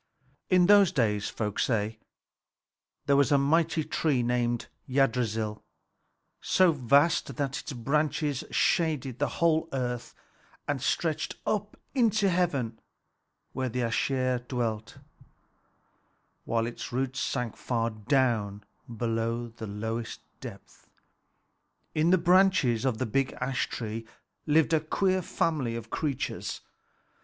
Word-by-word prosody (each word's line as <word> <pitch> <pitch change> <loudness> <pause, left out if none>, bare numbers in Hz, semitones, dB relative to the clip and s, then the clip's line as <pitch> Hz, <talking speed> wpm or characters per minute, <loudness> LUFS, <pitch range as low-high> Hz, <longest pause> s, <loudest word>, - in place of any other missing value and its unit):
In 180 -2 +5
those 200 -2 +6
days, 105 -5 +1
folk 105 -2 -3
say, 110 -2 0 1.1
there 140 - +3
was 140 0 +3
a 140 - +6
mighty 160 +4 +2
ash - - -7
tree 140 -6 +1
named 120 -1 0 0.2
Yggdrasil, 115 -5 0 0.8
so 185 -2 +4
vast 140 +1 +2
that 140 0 -2
its - - -7
branches 145 +3 0
shaded 145 -7 +1
the - - +2
whole 165 -1 +2
earth 125 -2 -3 0.5
and 145 -3 -1
stretched 160 +3 -1
up 210 0 -2 0.2
into 220 -6 +3
heaven 140 -11 0 0.7
where 130 -1 -2
the 125 +2 -2
Æsir 125 +1 0
dwelt, 115 -4 -3 1.5
while 115 -1 0
its 120 0 -6
roots 130 +1 -2
sank 125 -4 -2
far 115 -2 -1
down 110 -2 0 0.3
below 115 +1 -1
the 115 -1 -8
lowest 110 +3 -4 0.2
depth. - - -11 1.0
In 155 +2 +2
the 185 - +6
branches 175 - +3
of 130 -4 +1
the 130 - -1
big 135 +4 0
ash 125 0 -2
tree 115 0 -5 0.4
lived 155 +1 +3
a 160 - +5
queer 185 +4 +1
family 150 -9 -1
of 115 -1 -7
creatures. 145 -5 -3
130 Hz, 120 wpm, -28 LUFS, 115-155 Hz, 1.5 s, those